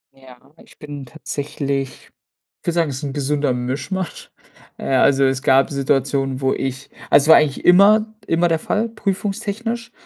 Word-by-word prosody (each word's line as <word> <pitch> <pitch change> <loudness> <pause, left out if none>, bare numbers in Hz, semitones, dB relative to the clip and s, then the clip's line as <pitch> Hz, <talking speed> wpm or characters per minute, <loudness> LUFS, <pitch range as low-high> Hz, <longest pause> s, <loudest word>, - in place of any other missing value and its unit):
Ja, 130 -2 -16 0.3
ich - - -21
bin 145 -3 -8
tatsächlich 140 0 -5 0.5
ich - - -17
würde 170 - +1
sagen, 165 -3 +1
es 130 - -5
ist 135 - -8
'n 140 -1 -4
gesunder 145 -1 0
Mischmasch. 140 +10 -4 0.5
Äh, - - -7
also 135 +1 +4
es 135 +1 +1
gab 135 0 +4
Situationen, 135 -1 -1
wo 135 0 +1
ich 135 +1 -4 0.2
also 140 0 +6
es - - -3
war - - +10
eigentlich 145 -2 +2
immer 215 +4 +5
immer 170 +1 +2
der 165 -1 +1
Fall, 220 +7 -2
prüfungstechnisch, 215 +3 -3
145 Hz, 165 wpm, -20 LUFS, 135-180 Hz, 0.5 s, war